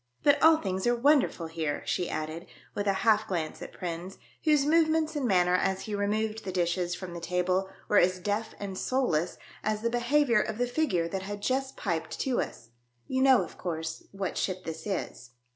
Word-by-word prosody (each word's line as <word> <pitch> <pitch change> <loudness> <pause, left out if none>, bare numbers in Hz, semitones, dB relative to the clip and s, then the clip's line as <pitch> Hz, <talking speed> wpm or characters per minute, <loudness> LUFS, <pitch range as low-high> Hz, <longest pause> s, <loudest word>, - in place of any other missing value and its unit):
" - - -41
But 290 0 +4
all 320 0 +7
things 190 -5 -2
are 240 - +4
wonderful 265 - +3
here," 160 -2 -3
she 180 - -1
added, 155 +2 -4 0.3
with 205 0 -2
a 195 - +4
half 220 -1 +4
glance 165 -4 -3
at - - -7
Prins, 175 +1 -6 0.3
whose 300 -3 +4
movements 315 0 +3
and 280 -4 0
manner 180 -3 +3
as 190 +1 +1
he 215 - -5
removed 215 +2 -1
the 190 - -4
dishes 175 0 0
from 185 -2 -7
the 170 - -5
table 180 +2 0 0.2
were 205 - +5
as 185 +1 +3
deaf 205 +4 -2
and 200 -2 -5
soulless 180 -11 0 0.3
as 215 0 -1
the 235 - +1
behaviour 240 -1 +3
of 215 0 -3
the 245 - +1
figure 240 - 0
that 190 +2 -3
had 205 +1 -6
just 265 +2 -1
piped 170 -5 -3
to 260 -2 +1
us. 115 - -7 0.4
"You 260 0 -1
know, 265 -2 +6
of - - -11
course, 160 -2 -4
what 195 -2 -3
ship 185 -1 -2
this 160 +5 -6
is 125 - -4
200 Hz, 200 wpm, -29 LUFS, 175-245 Hz, 0.4 s, all